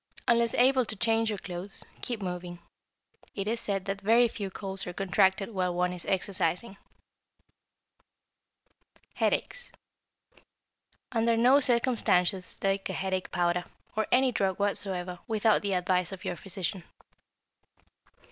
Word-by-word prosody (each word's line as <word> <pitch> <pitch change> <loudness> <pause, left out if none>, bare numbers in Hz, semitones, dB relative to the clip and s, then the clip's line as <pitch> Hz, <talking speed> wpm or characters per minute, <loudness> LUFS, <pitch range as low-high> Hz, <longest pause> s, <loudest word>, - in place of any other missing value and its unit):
Unless 235 -1 +3
able 260 +1 +5
to 215 - -5
change 225 +1 +1
your 210 - -2
clothes, 185 +1 -7 0.2
keep 230 -5 -4
moving. 180 -1 -5 0.8
It 195 0 -3
is 230 +2 0
said 195 -3 -2
that 195 0 -3
very 230 +4 +5
few 205 -3 -5
colds 195 -1 -6
are 180 - -4
contracted 190 +2 +2
while 180 -3 -1
one 180 0 +1
is 180 - -8
exercising. 190 +1 -1 2.4
=Headaches.= - - -1 1.4
Under 230 -1 +2
no 250 +4 +6
circumstances 220 -8 +1
take 195 0 -1
a - - -2
headache 190 -1 -2
powder, 175 0 +1 0.3
or 220 0 0
any 260 +1 +4
drug 195 -5 0
whatsoever, 185 -3 0
without 220 -1 +3
the 200 -1 -1
advice 180 -1 +1
of 190 +1 -8
your 180 -1 -2
physician. 190 -1 -4
195 Hz, 130 wpm, -29 LUFS, 180-225 Hz, 2.4 s, no